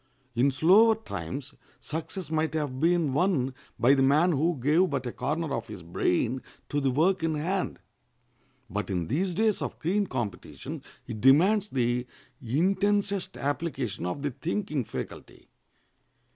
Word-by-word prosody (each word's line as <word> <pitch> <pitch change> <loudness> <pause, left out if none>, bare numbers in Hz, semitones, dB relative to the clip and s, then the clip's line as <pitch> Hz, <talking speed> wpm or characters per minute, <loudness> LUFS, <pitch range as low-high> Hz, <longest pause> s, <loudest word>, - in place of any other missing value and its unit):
In 120 +4 +3
slower 195 +11 +5
times 140 - -6 0.3
success 160 +1 -5
might 160 -1 0
have 145 -4 -2
been 165 -3 +2
won 145 -5 +1 0.2
by 125 +4 +5
the 135 - +3
man 150 +7 +4
who 160 +2 +1
gave 155 +8 +3
but 135 -3 -2
a 120 - -2
corner 155 +4 -2
of 115 - -3
his 90 - -9
brain 100 +9 0 0.3
to 145 - 0
the 135 - +2
work 170 +8 +2
in 160 -1 0
hand, 180 +5 -1 0.9
but 105 +2 -3
in 90 -4 -2
these 175 +6 0
days 220 0 +2
of - - -4
keen 195 +5 +1
competition 120 - -5 0.2
it 105 - -6
demands 185 - +5
the 125 -1 0 0.3
intensest 195 - +1
application 135 - -2
of 140 +11 -4
the 145 - 0
thinking 160 - -2
faculty. - - -8
150 Hz, 145 wpm, -28 LUFS, 130-180 Hz, 0.9 s, slower